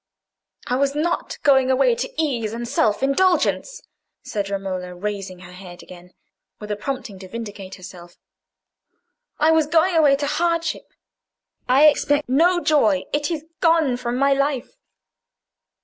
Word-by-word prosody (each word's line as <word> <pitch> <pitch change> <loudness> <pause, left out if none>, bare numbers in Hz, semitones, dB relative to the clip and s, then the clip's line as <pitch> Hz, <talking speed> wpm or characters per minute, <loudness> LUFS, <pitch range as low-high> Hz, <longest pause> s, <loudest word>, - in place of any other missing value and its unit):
"I 250 - -1
was 280 +1 0
not 330 +3 -2
going 265 -2 +4
away 275 - +3
to 485 +1 -4
ease 240 -9 -1
and 235 +1 -5
self 215 0 0
indulgence," 370 - +1 0.4
said 200 -2 -4
Romola, 185 -2 -4
raising 195 -1 -5
her 180 -1 -12
head 180 -1 -12
again, 180 0 -14 0.5
with 210 0 -7
a - - 0
prompting 235 -3 -6
to 190 - -10
vindicate 200 -3 -8
herself. 175 -2 -13 1.2
"I 310 +1 +3
was 320 -2 +3
going 335 +3 +2
away 295 -4 +5
to 285 +1 -3
hardship. 335 +2 -1 0.8
I 270 +4 +6
expect 290 0 +3
no 340 +8 +3
joy: 220 - +2
it 295 0 0
is 315 -3 -4
gone 325 -6 +3
from 245 0 -3
my 275 +1 +3
life." 275 -2 -2
265 Hz, 145 wpm, -21 LUFS, 200-305 Hz, 1.2 s, I